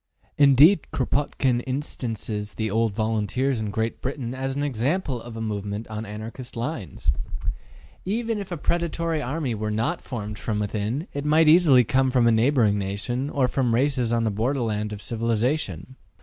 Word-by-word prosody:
Indeed, 145 Hz, +5 st, +6 dB
Kropotkin 130 Hz, -2 st, 0 dB
instances 115 Hz, -6 st, -3 dB
the 110 Hz, -2 st, -2 dB
old 115 Hz, +1 st, +2 dB
volunteers 115 Hz, +3 st, 0 dB
in 105 Hz, -, -2 dB
Great 110 Hz, +2 st, -2 dB
Britain 130 Hz, -2 st, -3 dB
as 135 Hz, 0 st, -3 dB
an 145 Hz, -, -1 dB
example 135 Hz, -, -1 dB
of 115 Hz, -1 st, -9 dB
a -, -, -4 dB
movement 105 Hz, 0 st, -3 dB
on 110 Hz, 0 st, -5 dB
Anarchist 115 Hz, +4 st, -7 dB
lines. 110 Hz, -, -2 dB, 0.9 s
Even 225 Hz, +2 st, -1 dB
if 195 Hz, -2 st, -7 dB
a 175 Hz, -, -2 dB
predatory 165 Hz, 0 st, -1 dB
army 135 Hz, -1 st, -2 dB
were 110 Hz, 0 st, -3 dB
not 115 Hz, +11 st, -1 dB
formed 105 Hz, -4 st, -6 dB
from 110 Hz, -2 st, -2 dB
within, 105 Hz, -, -2 dB
it 145 Hz, -, -3 dB
might 155 Hz, +2 st, +4 dB
easily 155 Hz, -6 st, +7 dB
come 130 Hz, +2 st, +2 dB
from 125 Hz, -2 st, +3 dB
a 115 Hz, -, +5 dB
neighboring 115 Hz, -3 st, +3 dB
nation, 100 Hz, +8 st, -2 dB
or 135 Hz, -3 st, +2 dB
from 125 Hz, -3 st, +1 dB
races 130 Hz, -2 st, +1 dB
on 115 Hz, -1 st, +2 dB
the 110 Hz, -, +1 dB
borderland 110 Hz, -2 st, -1 dB
of 105 Hz, -1 st, -7 dB
civilization. 115 Hz, -, -1 dB
120 Hz, 165 wpm, -25 LUFS, 110-140 Hz, 0.9 s, easily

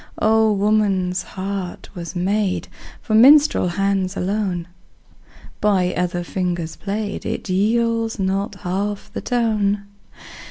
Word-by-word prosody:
Oh! 220 Hz, 0 st, +4 dB
woman's 200 Hz, -3 st, +1 dB
heart 190 Hz, -1 st, -5 dB
was 170 Hz, -2 st, -7 dB
made 195 Hz, +2 st, 0 dB, 0.4 s
For 220 Hz, -, -3 dB
minstrel 280 Hz, +1 st, +6 dB
hands 195 Hz, +1 st, 0 dB
alone; 185 Hz, -3 st, -1 dB, 0.9 s
By 185 Hz, -4 st, +2 dB
other 175 Hz, 0 st, -1 dB
fingers 175 Hz, -2 st, -3 dB
played, 205 Hz, 0 st, -4 dB
It -, -, -4 dB
yields 225 Hz, +4 st, +1 dB
not 195 Hz, +1 st, -1 dB
half 200 Hz, +2 st, -3 dB
the -, -, -4 dB
tone. 215 Hz, -4 st, 0 dB
200 Hz, 110 wpm, -21 LUFS, 185-215 Hz, 0.9 s, minstrel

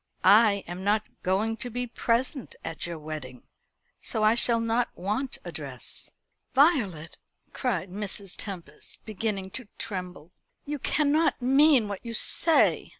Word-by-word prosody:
"I 205 Hz, -2 st, +6 dB
am 175 Hz, +2 st, -6 dB
not 210 Hz, +2 st, +2 dB, 0.2 s
going 210 Hz, +5 st, 0 dB
to 245 Hz, -, -3 dB
be 245 Hz, +2 st, -3 dB
present 245 Hz, +3 st, -1 dB
at 165 Hz, +1 st, -4 dB
your 170 Hz, -1 st, -5 dB
wedding, 150 Hz, -5 st, -7 dB, 0.6 s
so 220 Hz, -, -1 dB
I 215 Hz, +1 st, +6 dB
shall 235 Hz, 0 st, +4 dB
not 230 Hz, +1 st, +1 dB
want 210 Hz, +9 st, -2 dB
a -, -, -5 dB
dress." -, -, -6 dB, 0.5 s
"Violet!" 220 Hz, -, +2 dB, 0.3 s
cried 245 Hz, -8 st, -2 dB
Mrs. 200 Hz, -1 st, -3 dB
Tempest, 175 Hz, -8 st, -7 dB
beginning 210 Hz, -3 st, -3 dB
to 255 Hz, 0 st, -5 dB
tremble. 180 Hz, -5 st, -6 dB, 0.3 s
"You 295 Hz, 0 st, -3 dB
cannot 300 Hz, +4 st, +2 dB
mean 270 Hz, -1 st, +5 dB
what 200 Hz, -1 st, -6 dB
you 230 Hz, -1 st, -5 dB
say. 325 Hz, +8 st, +3 dB
215 Hz, 140 wpm, -27 LUFS, 185-245 Hz, 0.6 s, I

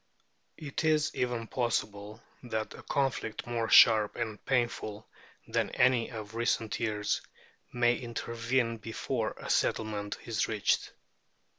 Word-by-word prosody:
It 145 Hz, -1 st, -4 dB
is 155 Hz, -1 st, +2 dB
even 120 Hz, -2 st, -1 dB
possible 110 Hz, -3 st, -2 dB, 0.2 s
that 110 Hz, -3 st, -3 dB
a -, -, -10 dB
conflict 135 Hz, -5 st, -1 dB
more 115 Hz, -2 st, -2 dB
sharp 110 Hz, -2 st, +7 dB
and 110 Hz, -3 st, -4 dB
painful 115 Hz, -4 st, -1 dB, 0.4 s
than -, -, 0 dB
any 125 Hz, -2 st, +3 dB
of 110 Hz, -2 st, -7 dB
recent 115 Hz, -2 st, 0 dB
years 105 Hz, -2 st, 0 dB, 0.5 s
may 120 Hz, 0 st, +3 dB
intervene 115 Hz, 0 st, -1 dB
before 115 Hz, +1 st, -3 dB
a -, -, -8 dB
settlement 105 Hz, -2 st, 0 dB
is 115 Hz, -2 st, 0 dB
reached. 110 Hz, -2 st, 0 dB
115 Hz, 120 wpm, -30 LUFS, 110-120 Hz, 0.5 s, sharp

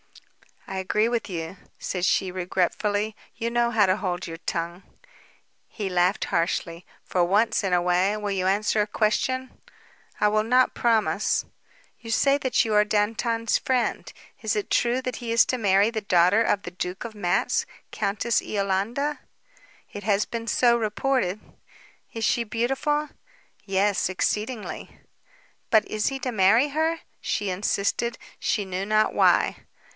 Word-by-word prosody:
"I 190 Hz, -, -6 dB
agree 210 Hz, +4 st, +1 dB
with 235 Hz, -3 st, -2 dB
you," 165 Hz, +1 st, -5 dB, 0.2 s
said 180 Hz, -1 st, -2 dB
she 190 Hz, -1 st, +1 dB
regretfully. 205 Hz, +4 st, -1 dB, 0.2 s
"You 230 Hz, +1 st, -3 dB
know 240 Hz, 0 st, +2 dB
how 220 Hz, -3 st, +4 dB
to 185 Hz, +1 st, +2 dB
hold 180 Hz, -3 st, -3 dB
your 165 Hz, -1 st, -7 dB
tongue." 170 Hz, +1 st, -4 dB, 0.9 s
He 205 Hz, -3 st, -5 dB
laughed 180 Hz, +2 st, +1 dB
harshly. 170 Hz, 0 st, -2 dB, 0.2 s
"For 180 Hz, -, 0 dB
once 205 Hz, +6 st, +2 dB
in 190 Hz, -2 st, 0 dB
a 175 Hz, -, +3 dB
way, 180 Hz, +3 st, +2 dB
will 210 Hz, -1 st, -3 dB
you 185 Hz, -1 st, 0 dB
answer 210 Hz, +2 st, +2 dB
a 205 Hz, -, 0 dB
question?" 255 Hz, +5 st, -1 dB, 0.6 s
"I 210 Hz, -, +4 dB
will 215 Hz, 0 st, +2 dB
not 250 Hz, +3 st, +3 dB
promise." 225 Hz, -3 st, +1 dB, 0.5 s
"You 230 Hz, -, -10 dB
say 275 Hz, +5 st, +3 dB
that 255 Hz, -3 st, +1 dB
you 220 Hz, -, -1 dB
are 210 Hz, 0 st, +5 dB
Dantan's 225 Hz, +2 st, 0 dB
friend. 255 Hz, -2 st, -1 dB, 0.3 s
Is -, -, -1 dB
it 415 Hz, -2 st, -3 dB
true 245 Hz, +2 st, +2 dB
that 255 Hz, -3 st, -3 dB
he 235 Hz, -2 st, -5 dB
is 230 Hz, 0 st, +5 dB
to 255 Hz, -, 0 dB
marry 200 Hz, 0 st, +3 dB
the 220 Hz, -2 st, -3 dB
daughter 185 Hz, +2 st, +4 dB
of 205 Hz, -3 st, +1 dB
the 175 Hz, -, -7 dB
Duke 180 Hz, +1 st, -5 dB
of 230 Hz, -2 st, -7 dB
Matz, 195 Hz, -3 st, 0 dB, 0.3 s
Countess 215 Hz, +3 st, 0 dB
Iolanda?" 210 Hz, +9 st, -1 dB, 0.7 s
"It 205 Hz, -, -8 dB
has 205 Hz, 0 st, +2 dB
been 230 Hz, -1 st, -5 dB
so 235 Hz, +2 st, +3 dB
reported." 215 Hz, -2 st, -1 dB, 0.7 s
"Is 225 Hz, -, -4 dB
she 235 Hz, +2 st, +2 dB
beautiful?" 270 Hz, +7 st, -1 dB, 0.6 s
"Yes; 195 Hz, 0 st, +1 dB
exceedingly." 210 Hz, +5 st, -3 dB, 0.7 s
"But 220 Hz, -1 st, +4 dB
is 215 Hz, -1 st, -1 dB
he 270 Hz, -, -1 dB
to 255 Hz, -1 st, -3 dB
marry 220 Hz, +6 st, +4 dB
her?" 320 Hz, +3 st, 0 dB, 0.2 s
she 205 Hz, -2 st, -2 dB
insisted, 205 Hz, +4 st, -1 dB, 0.2 s
she 205 Hz, -3 st, 0 dB
knew 190 Hz, +1 st, -3 dB
not 215 Hz, +1 st, +2 dB
why. -, -, +3 dB
210 Hz, 155 wpm, -25 LUFS, 190-235 Hz, 0.9 s, are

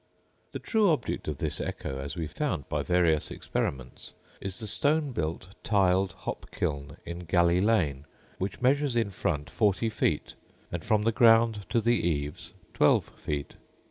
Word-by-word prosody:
The -, -, -4 dB
true 220 Hz, -4 st, +2 dB
object 150 Hz, -9 st, -1 dB
of 75 Hz, -2 st, -2 dB
this -, -, -3 dB
echo, 65 Hz, 0 st, -4 dB
as 70 Hz, +4 st, -5 dB
we 85 Hz, -2 st, -2 dB
found 80 Hz, -, -3 dB
by -, -, -1 dB
various 85 Hz, -4 st, +2 dB
experiments, 65 Hz, -2 st, -4 dB, 0.3 s
is 95 Hz, -1 st, -4 dB
the 110 Hz, -, -5 dB
stone 145 Hz, +7 st, +1 dB
built, 85 Hz, -2 st, -3 dB
tiled 95 Hz, -2 st, +2 dB
hop -, -, -6 dB
kiln 70 Hz, -1 st, -3 dB
in 85 Hz, +1 st, -7 dB
Galleylane, 85 Hz, -3 st, +2 dB, 0.3 s
which 95 Hz, +6 st, -4 dB
measures 140 Hz, 0 st, +3 dB
in 115 Hz, -4 st, +1 dB
front 75 Hz, -6 st, -2 dB
40 110 Hz, +1 st, +1 dB
feet, 75 Hz, -7 st, 0 dB, 0.4 s
and 85 Hz, -2 st, -4 dB
from 110 Hz, -2 st, +2 dB
the 115 Hz, -, +3 dB
ground 115 Hz, -2 st, +4 dB
to 115 Hz, -, +2 dB
the 120 Hz, +1 st, +2 dB
eaves 75 Hz, -3 st, -2 dB, 0.2 s
12 -, -, +3 dB
feet. 75 Hz, -1 st, -4 dB
95 Hz, 155 wpm, -28 LUFS, 80-115 Hz, 0.4 s, ground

